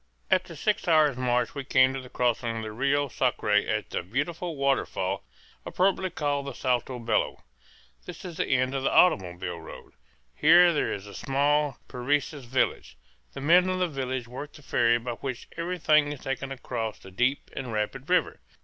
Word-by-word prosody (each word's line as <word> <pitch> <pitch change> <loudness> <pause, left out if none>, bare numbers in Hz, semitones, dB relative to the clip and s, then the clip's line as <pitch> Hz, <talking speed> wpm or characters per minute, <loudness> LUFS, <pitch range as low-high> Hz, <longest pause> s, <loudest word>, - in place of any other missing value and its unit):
After - - +1
six - - -1
hours' 155 -4 +4
march 125 -1 0
we 140 - -5
came 130 0 +4
to 135 - -4
the 125 - -12
crossing 120 -2 0
of 110 - -4
the 110 - -5
Rio 140 +5 +1
Sacre 125 -4 -1
at 105 +1 +1
the - - -1
beautiful 150 - -3
waterfall 140 -1 0 0.4
appropriately 190 0 +1
called 145 -4 -2
the 140 - -4
Salto 125 0 -1
Bello. 115 -3 -1 0.6
This - - -9
is 170 -3 -7
the - - 0
end 130 0 +1
of 135 - -1
the 135 - +1
automobile 90 - +2
road. 80 - -12 0.4
Here 175 - +6
there 150 - 0
is 100 - -5
a 100 - -11
small 145 +1 +1
Parecis 140 +2 -1
village. 120 - -1 0.4
The - - -7
men 175 +5 +5
of 185 - 0
the 180 -1 +1
village 130 -5 -4
work 140 +5 -8
the 150 - -15
ferry 120 -3 +3
by 120 +1 -5
which 125 0 -6
everything 160 -4 +2
is 145 - -7
taken 135 +1 -4
across 120 -4 -4
the 95 - -14
deep 125 +8 0
and 130 -3 -5
rapid 115 +7 -3
river. 180 - +2
135 Hz, 180 wpm, -27 LUFS, 120-145 Hz, 0.6 s, Here